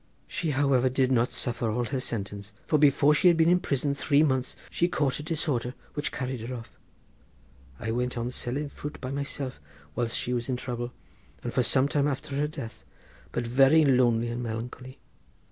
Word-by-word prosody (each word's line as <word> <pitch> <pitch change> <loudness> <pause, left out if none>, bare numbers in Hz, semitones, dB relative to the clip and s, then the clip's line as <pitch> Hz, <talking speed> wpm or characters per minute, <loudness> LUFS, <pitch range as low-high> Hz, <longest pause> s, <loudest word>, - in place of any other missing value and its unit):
She, 165 - -2
however, 135 -2 +3
did 130 0 +2
not 120 -1 +3
suffer 120 -2 -2
all 120 +3 0
her 135 +2 -2
sentence, 100 -4 -5
for 155 - +2
before 145 0 +5
she 165 - +4
had 170 -2 +6
been 165 0 +5
in 180 - +5
prison 140 -4 0
three 140 +1 +3
months 130 -3 0 0.2
she 175 - +2
caught 145 -6 0
a - - -4
disorder 145 -6 -2 0.2
which 145 - -2
carried 130 -3 -3
her 125 +3 -4
off. 115 -1 -9 1.1
I 110 - -2
went 125 +1 -1
on 120 +1 -2
selling 135 +4 -3
fruit 145 +1 -7
by 130 -1 -5
myself 140 - -4 0.3
whilst 115 +4 -1
she 125 - -1
was 120 +1 -2
in 130 - +1
trouble, 120 -1 -4 0.5
and 120 - -3
for 130 - +3
some 130 +3 +3
time 145 0 +1
after 140 0 -3
her 150 +1 +1
death, 115 -7 -8 0.5
but 120 - -2
very 135 +6 +5
lonely 120 -3 +3
and 120 +1 -3
melancholy. 120 +3 -6
130 Hz, 190 wpm, -28 LUFS, 120-145 Hz, 1.1 s, had